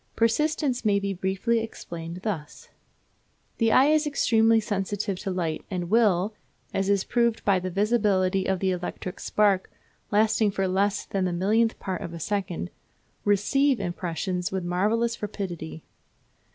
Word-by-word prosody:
Persistence 265 +3 +1
may 205 -2 +3
be 200 0 -2
briefly 190 +5 0
explained 170 -6 -7
thus: 170 -9 -5 0.9
The 225 -1 +3
eye 260 - +6
is 305 0 +3
extremely 225 -5 +3
sensitive 200 -2 -2
to 200 - -4
light, 170 -4 -2
and 180 -2 -3
will, 210 -3 +3 0.4
as 195 0 0
is 200 -1 +3
proved 235 -2 0
by 195 -2 +4
the 185 +1 -4
visibility 195 -2 +1
of 190 - +1
the 190 +1 0
electric 180 +1 -5
spark, 200 -3 +2 0.4
lasting 215 0 +3
for 195 -1 -1
less 200 +2 0
than 195 -2 -1
the 180 - 0
millionth 215 +6 +2
part 185 -2 -4
of 170 - -6
a - - -7
second, 180 - -3 0.5
receive 250 +7 +3
impressions 180 0 -3
with 190 -1 -2
marvellous 215 +7 0
rapidity. 175 -6 -5
200 Hz, 145 wpm, -26 LUFS, 185-225 Hz, 0.9 s, eye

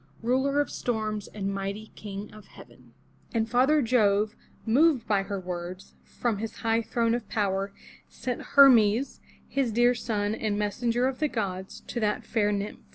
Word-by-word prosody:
Ruler 265 +4 +2
of 290 - 0
Storms, 215 -3 -2
and 195 -1 -4
mighty 200 +2 -5
King 205 0 -7
of 215 -2 -13
Heaven. - - -17 0.4
And 225 -1 +1
father 265 +5 +3
Jove, 215 -3 +2 0.3
moved 265 +2 +3
by 205 -2 +2
her 195 0 -4
words, 180 0 -6
from 230 -4 -2
his 225 +1 -5
high 225 0 +3
throne 230 0 0
of 235 -3 -3
power, 195 -2 -1 0.4
sent 250 -2 -4
Her'mes, 250 -3 +6 0.3
his 270 -4 0
dear 240 +2 +4
son, 215 -3 -2
and 215 -2 -2
messenger 230 +4 0
of 265 -1 -3
the 305 - +2
gods, 190 -7 -4
to - - -5
that 210 -2 -1
fair 210 -3 +1
nymph. 205 0 -3
220 Hz, 160 wpm, -27 LUFS, 205-245 Hz, 0.4 s, Her'mes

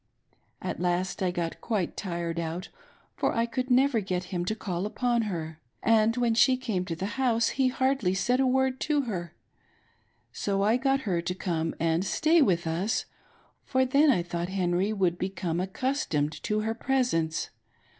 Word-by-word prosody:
At - - -3
last 180 +2 -1
I 185 - +2
got 170 -2 -3
quite 210 -7 -1
tired 170 -3 -3
out, 170 +3 -4 0.5
for - - 0
I 230 0 +2
could 255 +2 -3
never 260 -1 +4
get 185 -3 -2
him 175 -1 -1
to 215 - -1
call 190 -2 -3
upon 240 +2 0
her, 160 -3 -5 0.2
and 225 +1 +3
when 240 -2 +2
she 255 +3 +4
came 215 -8 -2
to 170 - -3
the 200 +10 -4
house 230 -3 +3
he 265 -1 +1
hardly 260 -7 +1
said 245 +6 +1
a 265 - +3
word 265 0 +1
to 300 -2 +1
her; 175 - -5 1.0
so 195 -1 -1
I 220 +4 +3
got 270 +1 +1
her 185 -8 -1
to 180 +2 -3
come 165 -3 -2
and 165 +2 +1
stay 320 - +3
with 175 -10 +2
us, 175 +7 -1 0.6
for 260 0 +1
then 285 +4 +4
I 185 -10 +3
thought 175 0 -3
Henry 185 +1 0
would 185 -5 0
become 180 -3 -2
accustomed 185 - -1
to 215 -1 0
her 220 +1 -1
presence. 225 -11 0
200 Hz, 175 wpm, -28 LUFS, 175-250 Hz, 1.0 s, never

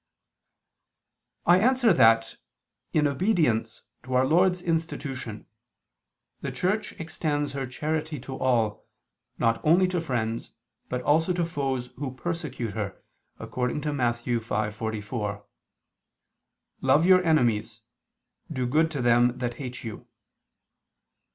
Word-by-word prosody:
I 175 +2 +6
answer 245 -1 +4
that, 115 -6 +4 0.5
In 150 -1 +2
obedience 145 - +1 0.2
to 130 +1 -4
Our 130 +1 +4
Lord's 180 +4 +3
institution, 145 - -3 0.9
the - - -4
Church 200 +4 -1
extends 155 -4 -2
her 135 -1 -3
charity 155 +3 -3
to 130 +1 -7
all, 115 -5 0 0.5
not 115 0 +1
only 175 +4 +5
to 180 -2 -1
friends, 115 -6 -3 0.4
but 125 0 -2
also 160 +6 +3
to 175 -1 0
foes 135 -6 -2
who 135 -3 -4
persecute 130 -8 -4
her, 100 -3 -4 0.4
according 125 +4 -2
to 150 -1 -2
Matt. 120 -4 +1
5:44: 110 -2 -3 1.4
"Love 135 +5 +4
your 185 0 +6
enemies; 115 -8 +1 0.7
do 130 -1 -1
good 155 +6 +2
to 145 -5 -3
them 120 +1 +4
that 120 -1 -2
hate 125 -3 -6
you." 110 -3 -8
130 Hz, 115 wpm, -26 LUFS, 115-160 Hz, 1.4 s, I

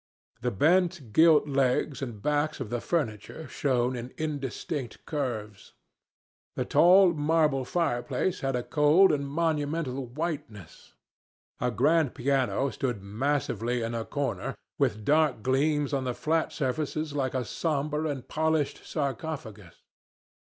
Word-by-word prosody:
The 125 - 0
bent 160 - +1
gilt 160 -2 +6
legs 135 0 +1
and 115 -6 -6
backs 150 +1 0
of 120 -5 -5
the 120 -1 -2
furniture 145 - -3
shone 130 -2 0
in 120 +1 -7
indistinct 145 -3 -4
curves. 110 -9 -4 0.8
The - - -1
tall 180 +1 +6
marble 150 -3 +2
fireplace 145 +1 -1
had 135 -1 -1
a 125 - -1
cold 155 +7 +5
and 140 -2 -1
monumental 150 -3 -1
whiteness. 140 - -6 0.6
A 125 - +1
grand 145 +5 +2
piano 135 +1 +1
stood 120 -7 -3
massively 120 +1 -1
in 115 +1 -3
a 115 -1 -2
corner, 140 +3 -3 0.2
with 105 0 0
dark 150 -7 +2
gleams 145 +2 +1
on 135 -1 0
the 125 -1 -2
flat 160 +1 0
surfaces 150 +2 -2
like 135 -3 -1
a 125 -2 -1
somber 150 +2 -1
and 140 -4 -4
polished 160 -2 0
sarcophagus. 135 - -5
140 Hz, 130 wpm, -28 LUFS, 125-155 Hz, 0.8 s, gilt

